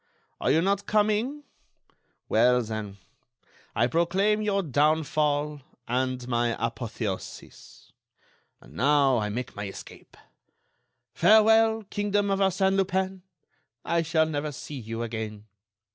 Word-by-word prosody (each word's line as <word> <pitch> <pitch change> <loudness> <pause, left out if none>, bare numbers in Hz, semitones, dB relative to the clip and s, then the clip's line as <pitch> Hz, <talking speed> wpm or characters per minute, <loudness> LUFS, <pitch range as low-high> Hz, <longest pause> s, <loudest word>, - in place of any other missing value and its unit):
Are - - 0
you 160 +3 +3
not 200 +1 0
coming? 215 +7 +1 0.8
Well, 125 0 +3
then, 110 -3 -6 0.8
I 115 - +3
proclaim 190 - +1
your 200 -2 0
downfall 150 0 +1 0.3
and 125 0 -2
my 120 -1 0
apotheosis. 115 -4 -6 0.7
And - - -17
now 135 0 +3
I 105 -1 -2
make 125 +4 -5
my 105 -1 -5
escape. 95 - -12 1.0
Farewell, 220 +1 +5
kingdom 205 -1 0
of 195 - 0
Arsène 190 0 +2
Lupin! 190 0 -1 0.6
I 170 0 +1
shall 160 0 +2
never 150 -1 -3
see 140 +1 -8
you 115 0 -5
again. 110 -2 -5
150 Hz, 115 wpm, -26 LUFS, 120-195 Hz, 1.0 s, Farewell